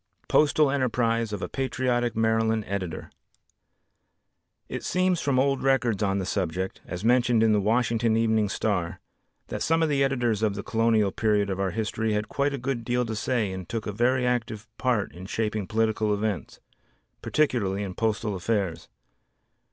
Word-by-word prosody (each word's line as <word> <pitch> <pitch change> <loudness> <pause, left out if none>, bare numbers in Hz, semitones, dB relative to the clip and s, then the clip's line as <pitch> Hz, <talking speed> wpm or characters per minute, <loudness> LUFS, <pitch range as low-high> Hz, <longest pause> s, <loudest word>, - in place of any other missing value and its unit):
Postal 150 -1 +4
Enterprise 115 -4 0
of 105 -2 -4
a - - -2
Patriotic 125 -3 -1
Maryland 110 0 +1
Editor 95 -5 -4 1.6
It - - -5
seems 185 -1 +1
from 140 -2 +1
old 135 +1 +2
records 125 -6 +1
on 100 -1 +1
the 95 - -2
subject 95 0 -2
as 90 +3 -5
mentioned 120 -1 +4
in 110 - +4
the 105 -1 +3
Washington 115 +1 +2
Evening 110 -2 +2
Star, 95 -6 -1 0.5
that - - -4
some 165 0 +2
of 160 - +1
the 140 -2 +2
editors 120 -6 0
of 105 -2 +1
the 100 - -5
colonial 110 -3 +2
period 105 -2 +1
of 95 - -3
our 95 -1 +1
history 110 +2 -1
had 105 +1 -2
quite 140 +1 0
a 140 - -3
good 130 -2 -3
deal 125 +1 0
to 110 -1 -4
say 110 -3 0
and 95 -2 -7
took 115 -1 -3
a 105 - -2
very 125 +4 +1
active 115 -3 -2
part 120 -6 0
in 90 +3 -9
shaping 105 -2 -2
political 110 -1 +1
events, 105 -2 -3 0.6
particularly 105 -10 0
in 95 -2 -5
postal 110 0 -1
affairs. 95 -2 -2
110 Hz, 165 wpm, -26 LUFS, 105-125 Hz, 1.6 s, Postal